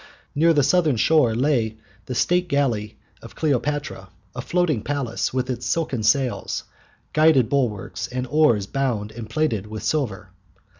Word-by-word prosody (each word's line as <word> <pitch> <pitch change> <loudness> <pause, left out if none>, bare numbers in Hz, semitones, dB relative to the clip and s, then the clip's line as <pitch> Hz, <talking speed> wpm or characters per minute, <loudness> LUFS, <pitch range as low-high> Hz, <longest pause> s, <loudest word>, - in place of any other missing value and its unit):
Near 165 +3 +4
the 145 -3 +3
southern 155 0 +3
shore 120 -1 +3
lay 120 -4 +1 0.3
the 125 - -4
state 175 +8 +2
galley 125 -9 -1 0.2
of - - -12
Cleopatra, 145 -8 -2 0.3
a - - -3
floating 170 -9 0
palace, 140 -1 -2
with 130 0 -1
its 125 -1 -4
silken 150 -8 -1
sails, 125 +4 0 0.5
gilded 155 -6 +4
bulwarks, 120 -9 -1
and 125 0 -4
oars 120 -7 +3
bound 115 -4 -2
and 110 -1 -8
plated 115 -7 -1
with 110 0 -7
silver. 110 -10 -2
130 Hz, 145 wpm, -23 LUFS, 110-150 Hz, 0.5 s, Near